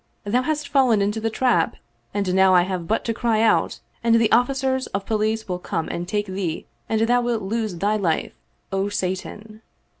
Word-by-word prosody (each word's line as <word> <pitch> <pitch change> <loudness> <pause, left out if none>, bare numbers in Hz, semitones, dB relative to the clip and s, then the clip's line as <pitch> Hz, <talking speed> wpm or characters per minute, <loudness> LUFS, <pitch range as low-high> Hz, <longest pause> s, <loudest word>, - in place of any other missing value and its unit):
Thou 230 +5 +1
hast 300 +1 -2
fallen 265 -6 +3
into 205 +2 0
the 225 - 0
trap 225 -7 +1 0.4
and 200 -3 -1
now 190 0 +5
I 175 - +6
have 180 -2 -4
but 220 - 0
to 230 - 0
cry 225 -1 +1
out 225 - +2 0.2
and 230 0 +4
the 230 -1 +4
ofiicers 260 +1 +1
of 195 0 -2
police 220 0 -1
will 180 -2 -3
come 165 -3 -3
and 175 +1 -4
take 205 +2 -1
thee 185 -4 -4 0.2
and 220 -1 +1
thou 245 +2 +3
wilt 240 -3 -1
lose 215 -1 -2
thy 205 +5 +1
life, 170 -6 -1 0.4
O 195 +1 0
Satan!" 205 +3 -4
215 Hz, 190 wpm, -23 LUFS, 190-230 Hz, 0.4 s, I